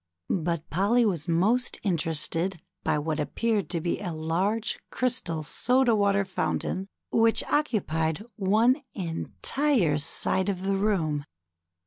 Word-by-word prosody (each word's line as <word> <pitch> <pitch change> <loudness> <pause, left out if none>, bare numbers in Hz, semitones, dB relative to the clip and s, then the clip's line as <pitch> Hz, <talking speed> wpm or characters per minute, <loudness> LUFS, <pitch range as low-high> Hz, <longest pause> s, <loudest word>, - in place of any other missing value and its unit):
But 170 -1 -2
Polly 210 +8 +3
was 175 -8 -1
most 205 +10 +1
interested 165 0 0 0.2
by 155 -1 +1
what 155 +1 -2
appeared 200 +5 0
to 175 - -1
be 170 +1 -1
a 185 -4 -4
large 180 +8 -1
crystal 170 -11 -1
soda 250 - +2
water 200 -1 +2
fountain 190 0 -2 0.2
which 225 0 +3
occupied 195 - 0
one 220 +7 +3
entire 180 - 0
side 185 +6 0
of 185 -2 -2
the 195 0 +1
room. 175 -8 0
190 Hz, 120 wpm, -27 LUFS, 160-220 Hz, 0.2 s, Polly